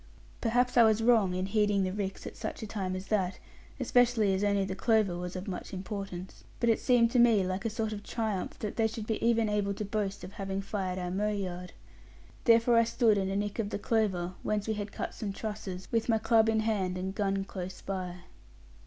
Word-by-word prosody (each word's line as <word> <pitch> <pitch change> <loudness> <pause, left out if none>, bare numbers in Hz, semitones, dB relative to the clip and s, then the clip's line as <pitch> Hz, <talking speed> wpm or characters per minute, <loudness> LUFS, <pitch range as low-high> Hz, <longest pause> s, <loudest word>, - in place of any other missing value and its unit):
Perhaps 245 +2 +2
I 235 - +9
was 220 0 +3
wrong 220 -6 +4
in 185 +1 -1
heeding 205 -1 +2
the 185 0 -1
ricks 195 -1 -4
at - - -7
such 220 0 -5
a - - -3
time 195 -3 -3
as 185 +1 -5
that; 195 -3 0 0.4
especially 240 -5 +3
as 190 +2 0
only 200 -1 +2
the 190 - -3
clover 215 -4 +2
was 180 +1 -5
of 185 +2 -5
much 185 0 -5
importance. 190 -2 -6 0.2
But 235 -1 +3
it 225 - +1
seemed 240 -3 +4
to 250 - +3
me 225 -5 +5
like 185 +2 -3
a - - +2
sort 220 0 -2
of 205 - -6
triumph 215 -4 -3
that 210 - -5
they 225 -1 +3
should 220 -1 -6
be 220 -1 -2
even 230 -1 +3
able 205 -1 0
to 210 - -4
boast 200 -1 -2
of 180 - -7
having 195 -1 -4
fired 190 -2 -3
our 180 -1 -3
mow 205 +3 0
yard. 180 -3 -4 0.7
Therefore 230 0 +5
I 230 - +6
stood 230 -1 +3
in 190 -1 0
a 195 - -2
nick 205 +2 -2
of 210 -3 0
the - - -2
clover, 195 -5 0
whence 210 0 -1
we 220 - +1
had 205 -1 -4
cut - - -4
some 205 -3 -4
trusses, 205 -4 -5
with 230 0 0
my 225 - +4
club 225 0 +4
in 220 0 +2
hand, 195 -5 0
and 190 +1 -3
gun 195 -1 0
close 185 -1 -6
by. 180 -2 -4
205 Hz, 225 wpm, -30 LUFS, 190-225 Hz, 0.7 s, I